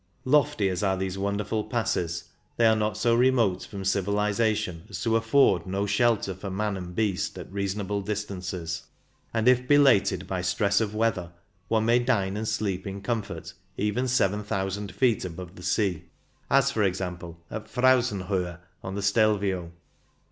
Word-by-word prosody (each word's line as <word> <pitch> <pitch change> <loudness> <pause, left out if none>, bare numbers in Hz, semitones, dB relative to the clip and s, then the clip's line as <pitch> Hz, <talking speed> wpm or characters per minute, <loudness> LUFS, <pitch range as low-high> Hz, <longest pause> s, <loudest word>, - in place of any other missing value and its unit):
Lofty 145 -5 +3
as 90 -2 -1
are 95 -2 +1
these 95 0 -3
wonderful 100 +2 -1
passes, 95 -7 -1 0.3
they 115 - +4
are 110 0 +6
not 105 -2 -1
so 120 0 +2
remote 120 -6 +3
from 100 -2 -7
civilization 100 -1 0
as 90 -4 -5
to 115 -1 +2
afford 115 -6 +3
no 100 +2 -1
shelter 105 -1 +2
for 95 +2 -7
man 105 +2 -1
and 90 -2 -7
beast 105 -4 -1
at - - -9
reasonable 100 0 -2
distances, 95 -5 -4 0.4
and, 115 +1 0
if 125 0 +4
belated 135 -10 +4
by 95 -1 -3
stress 100 +3 +1
of 105 -1 -2
weather, 105 -6 0 0.4
one 110 -1 +1
may 120 +1 +4
dine 105 -6 0
and 110 +1 -3
sleep 100 -4 -2
in 100 0 -5
comfort 115 0 -4 0.2
even 105 +5 0
seven 105 -4 +1
thousand 100 -1 -3
feet 120 0 +2
above 90 0 -7
the - - -11
sea; 90 -3 0 0.4
as, 140 0 +4
for 110 - -1
example, 90 -3 -2
at 110 0 -5
Frauzenhohe, 100 -9 +1 0.2
on 95 +1 -5
the 100 - -3
Stelvio. 100 -4 +1
100 Hz, 160 wpm, -26 LUFS, 95-110 Hz, 0.4 s, are